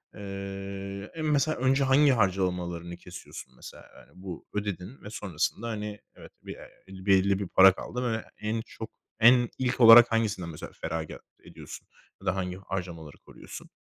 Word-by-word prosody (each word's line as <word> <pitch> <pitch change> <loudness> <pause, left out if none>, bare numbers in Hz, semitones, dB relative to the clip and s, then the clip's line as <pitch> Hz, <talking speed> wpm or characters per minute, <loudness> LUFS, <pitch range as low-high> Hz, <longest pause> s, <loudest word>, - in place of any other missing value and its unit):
Eee, 100 0 -7
en 160 -1 -3
mesela 150 +1 +1
önce 130 +2 +2
hangi 135 +2 +5
harcamalarını 90 -5 -1
kesiyorsun 90 -7 -11
mesela? - - -13
Yani, - - -18
bu 90 -2 -9
ödedin 105 +2 -5
ve 105 - -8
sonrasında, 105 +2 -3
hani, 105 -1 -5 0.2
evet, - - -14
be - - -8
eee, 95 0 -13
belli 95 0 +3
bir 100 - -3
para 95 +3 +7
kaldı 125 +6 -5
ve 110 - -3 0.2
en 110 +1 -2
çok, 110 0 -9 0.3
en 120 +1 +6
ilk 130 -1 -1
olarak 115 +1 +10
hangisinden 105 -6 -1
mesela 75 - -8
feragat 80 -1 -4 0.2
ediyorsun - - -11 0.3
ya - - -13
da 95 - +1
hangi 90 -1 -3
harcamaları 90 -5 -6
koruyorsun? - - -12
100 Hz, 155 wpm, -28 LUFS, 90-115 Hz, 0.3 s, olarak